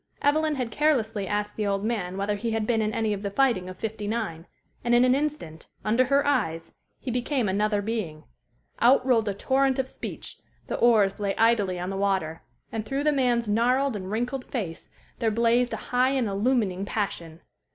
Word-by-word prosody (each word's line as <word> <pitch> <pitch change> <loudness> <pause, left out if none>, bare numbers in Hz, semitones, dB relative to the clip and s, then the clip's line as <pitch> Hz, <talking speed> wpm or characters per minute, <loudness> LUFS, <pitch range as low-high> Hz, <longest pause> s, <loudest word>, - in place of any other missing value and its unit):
Evelyn 305 +1 +2
had 250 -4 -3
carelessly 225 -8 +1
asked 210 +1 -2
the 210 -1 0
old 200 +1 -1
man 195 -5 -2
whether 200 +1 0
he 225 +3 -3
had 220 -1 0
been 225 -1 +1
in 215 0 0
any 220 -1 0
of 200 - -4
the 200 - -2
fighting 215 -5 +1
of 185 - -9
'59, 210 -5 -4 0.4
and 240 0 +3
in 245 +1 +5
an 255 - +4
instant, 275 - -3 0.2
under 230 +4 +3
her 280 +2 +2
eyes, 165 - 0 0.3
he 255 - -5
became 250 0 0
another 205 +1 +1
being. 195 -9 -3 0.6
Out 255 +2 +5
rolled 230 -5 +3
a 200 - -3
torrent 265 +5 +1
of 265 -1 0
speech; - - -8 0.3
the - - -3
oars 210 -5 +4
lay 200 -1 -1
idly 220 -5 +2
on 180 +2 -3
the - - -4
water; 190 -5 -1 0.3
and 220 -1 -3
through 270 +6 -2
the 300 - +3
man's 245 -5 +1
gnarled 250 +4 +2
and 190 -2 -5
wrinkled 245 +5 -2
face 190 -10 -5 0.3
there 230 -2 +2
blazed 235 +2 +2
a - - -2 0.2
high 250 +1 +4
and 265 -4 0
illumining 200 -2 0
passion. 170 -6 -4
225 Hz, 195 wpm, -26 LUFS, 200-250 Hz, 0.6 s, in